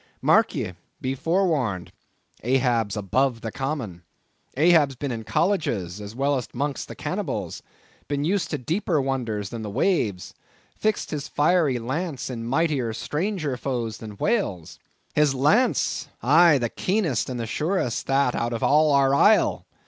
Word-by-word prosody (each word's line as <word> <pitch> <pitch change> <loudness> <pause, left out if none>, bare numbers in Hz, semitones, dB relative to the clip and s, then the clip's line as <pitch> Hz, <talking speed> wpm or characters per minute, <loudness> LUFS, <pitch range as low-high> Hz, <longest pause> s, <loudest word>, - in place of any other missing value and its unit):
Mark - - +3
ye, 90 - -3 0.3
be 130 0 -2
forewarned; 145 - 0 0.5
Ahab's 120 -4 +1
above 115 +4 0
the 115 - -4
common; 135 - -4 0.6
Ahab's 155 -3 +4
been 140 +2 -4
in 115 -2 -4
colleges, 105 - -1
as 105 +2 -8
well 140 +2 +1
as 125 - -4
'mong 145 -1 -2
the - - -9
cannibals; - - -4 0.5
been 145 0 -1
used 180 0 0
to 150 - -2
deeper 165 - -1
wonders 120 -7 -2
than 115 -1 -6
the 105 - -5
waves; 100 - 0 0.4
fixed 215 0 -1
his 150 -3 -3
fiery 150 -3 +2
lance 135 +3 -3
in 115 -2 -5
mightier, 135 -4 0
stranger 155 - -2
foes 120 -4 -3
than 105 -2 -9
whales. 150 - -1 0.3
His 150 -2 +3
lance! 150 - +2 0.2
aye, 155 +4 +6
the 120 -3 -1
keenest 180 - -1
and 125 -2 -4
the 115 - -2
surest 150 - -1
that 135 -2 +2
out 120 0 -1
of 115 - -3
all 150 0 +4
our 135 -1 +4
isle! 205 +10 +4
135 Hz, 150 wpm, -24 LUFS, 115-155 Hz, 0.6 s, aye